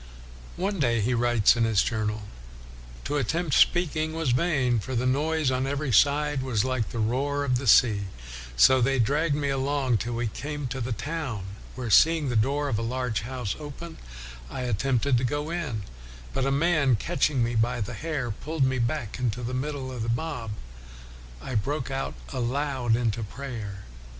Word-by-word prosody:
One 195 +1 -1
day 120 -5 +2
he 115 +4 +1
writes 120 -3 +4
in 115 - +1
his 110 -3 +3
journal, 110 -2 -2 0.4
" - - -16
To 145 +2 -1
attempt 150 +4 -1
WESLEY - - +6
speaking 160 -3 -1
was 160 -5 0
vain, 125 -4 +2
for 130 +5 -5
the 120 +2 0
noise 150 +2 +1
on 130 +1 0
every 140 0 -1
side 145 +4 +3
was 125 -5 0
like 130 -4 -1
the - - -6
roaring 140 +5 0
of 125 - +2
the 130 - -5
sea; 105 -3 +5 0.5
so 130 - +6
they 135 +3 +2
dragged 145 +6 +2
me 145 -1 -1
along 135 -2 +1
till 120 +3 -3
we 120 +1 -1
came 145 +6 -4
to 130 0 -4
the 120 +2 -3
town, 135 - -3 0.3
where 125 -4 -4
seeing 160 - +5
the 120 - -1
door 140 +6 +1
of 115 -6 0
a - - -2
large 125 -1 -1
house 120 -3 -4
open 155 +3 -8 0.5
I 130 - -5
attempted 125 +2 +1
to - - -3
go 145 +5 -1
in; 145 -12 -3 0.5
but 135 0 0
a - - +1
man, 140 -3 +3
catching 130 +4 +1
me 120 +1 -1
by 120 +2 +1
the 115 +3 -3
hair, 140 -1 -3
pulled 155 +7 -2
me 130 -1 +1
back 120 -1 -2
into 125 -1 -1
the 120 +2 -3
middle 135 0 -3
of 125 -3 -5
the 115 - -2
mob. 120 -1 -2 0.9
I 130 - -5
broke 135 +5 -1
out 135 0 -3 0.2
aloud 130 -1 0
into 115 -2 -1
prayer. 110 -4 -6
130 Hz, 185 wpm, -26 LUFS, 115-145 Hz, 0.9 s, WESLEY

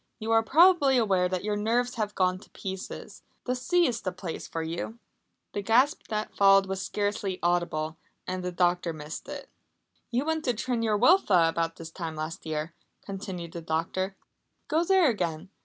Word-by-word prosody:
"You 225 -1 -3
are 225 0 +5
probably 295 +1 +5
aware 190 -6 +2
that 185 0 -2
your 210 0 -1
nerves 235 +4 0
have 210 -3 -3
gone 185 0 +1
to - - -17
pieces. 190 -1 -7 0.2
The 250 - 0
sea 345 +8 +2
is 235 -5 -1
the 185 - -2
place 180 -2 -6
for 165 - -3
you!" 170 +8 -4 0.6
The 205 - -2
gasp 245 +8 +2
that 215 -1 -3
followed 195 -1 +6
was 190 0 -3
scarcely 205 -2 -2
audible, 170 -3 0 0.3
and 185 0 -3
the 180 - -2
doctor 175 -1 +1
missed 155 - -8
it. 290 -1 -7 0.6
"You 250 +3 0
went 320 0 -1
to 245 -3 +1
Tryn 235 +1 -1
yr 215 -2 +2
Wylfa 210 - +5
about 165 0 -1
this 165 -1 -9
time 165 -2 -5
last 155 +1 -5
year," 155 +1 -3 0.3
continued 190 -4 -6
the 170 -1 -6
doctor. 165 +4 -2 0.5
"Go 325 +1 +2
there 375 -2 +4
again! 175 - -2
195 Hz, 180 wpm, -28 LUFS, 170-235 Hz, 0.6 s, followed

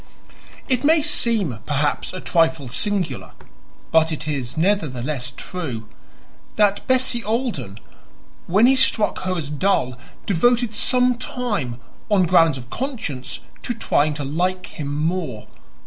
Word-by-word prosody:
It 255 -1 +1
may 310 +1 +4
seem, 205 - +3
perhaps, 145 0 0
a 185 - -6
trifle 165 -7 +1
singular 200 - -2 0.6
but 160 0 +4
it 155 -1 -4
is 135 -4 -3
nevertheless 150 -8 0
true 130 -12 -5 0.7
that 205 -1 +2
Bessie 255 -2 +1
Alden, 210 - -2 0.7
when 205 +6 +4
he 265 +2 +6
struck 220 -4 +2
her 185 -1 -2
as 150 -3 -4
dull, 145 -6 0 0.3
devoted 235 +4 +2
some 250 +2 +2
time, 205 - -3 0.3
on 200 -3 +4
grounds 165 -4 +4
of 125 0 -11
conscience, 230 - -4 0.2
to 240 - -3
trying 150 -8 +1
to 145 - -4
like 180 +6 -1
him 145 - -3
more. 150 -6 -2
175 Hz, 130 wpm, -22 LUFS, 145-225 Hz, 0.7 s, he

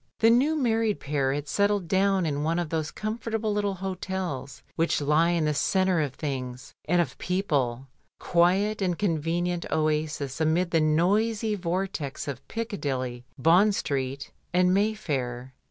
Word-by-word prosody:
The 225 0 +5
new 275 +7 +3
married 225 -6 +1
pair 140 -2 0
had 145 +1 -3
settled 200 -1 +1
down 195 0 +2
in 145 -2 -1
one 160 +3 0
of 175 -3 -2
those 155 -1 -1
comfortable 220 0 -3
little 205 -1 0
hotels 185 -7 -4
which 165 0 +1
lie 150 +3 +3
in 170 -2 +1
the 150 - +1
centre 185 +3 +2
of 140 -4 -3
things 130 -3 -5
and 175 +2 +2
of 175 - 0
people, 140 -10 -1 0.3
quiet 190 +5 +2
and 180 -3 0
convenient 175 -1 -1
oases 155 -2 -1
amid 170 +3 +2
the 165 - +3
noisy 205 +8 +2
vortex 175 -7 -3
of 135 -2 -6
Piccadilly, 135 - -3
Bond 180 +9 +4
Street, 135 -3 -3 0.2
and 180 +1 +3
Mayfair. 135 - -1
170 Hz, 145 wpm, -27 LUFS, 145-200 Hz, 0.3 s, The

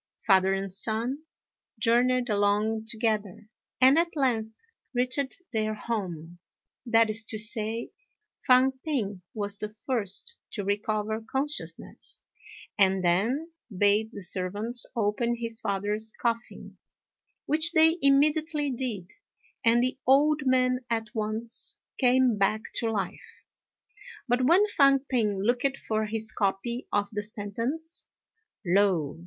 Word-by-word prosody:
Father 190 -2 +4
and 195 -1 -4
son 225 +7 -2 0.6
journeyed 245 +1 +2
along 210 +1 +1
together, 215 -3 -2 0.3
and 265 +4 +6
at 340 0 -1
length 225 -6 -1 0.4
reached 255 +4 -1
their 215 -1 -1
home; 175 -7 -5 0.5
that 230 -1 +4
is 215 +1 +3
to 220 - -4
say, 220 +1 +1 0.6
Fang 255 +1 +6
p'ing 210 - -2
was 205 -1 -2
the 210 - -4
first 220 - -3 0.2
to 205 - -3
recover 210 +2 -2
consciousness, 290 +3 -2 0.6
and 190 -1 +3
then 230 - +1 0.3
bade 205 +2 +3
the 200 - -6
servants 205 +6 -1
open 235 +2 0
his 230 -1 -4
father's 205 +2 -2
coffin, 235 0 -4 0.7
which 315 +2 +4
they 320 +2 +5
immediately 295 +2 +3
did, 230 -8 -4 0.5
and 235 +1 +4
the 255 +1 -2
old 290 +1 +4
man 255 -1 +2
at 225 -2 -2
once 220 +1 0 0.2
came 250 -4 +3
back 215 +2 +2
to 230 - 0
life. 205 -3 -5 0.8
But 250 +1 +2
when 365 +6 +5
Fang 275 -1 +6
p'ing 215 -8 -1
looked 250 +4 +1
for 215 -3 -2
his 220 0 -2
copy 210 +5 -2
of 205 0 +1
the 210 -1 -3
sentence, 230 - -4 0.6
lo! 175 -5 +1
225 Hz, 120 wpm, -27 LUFS, 205-255 Hz, 0.8 s, and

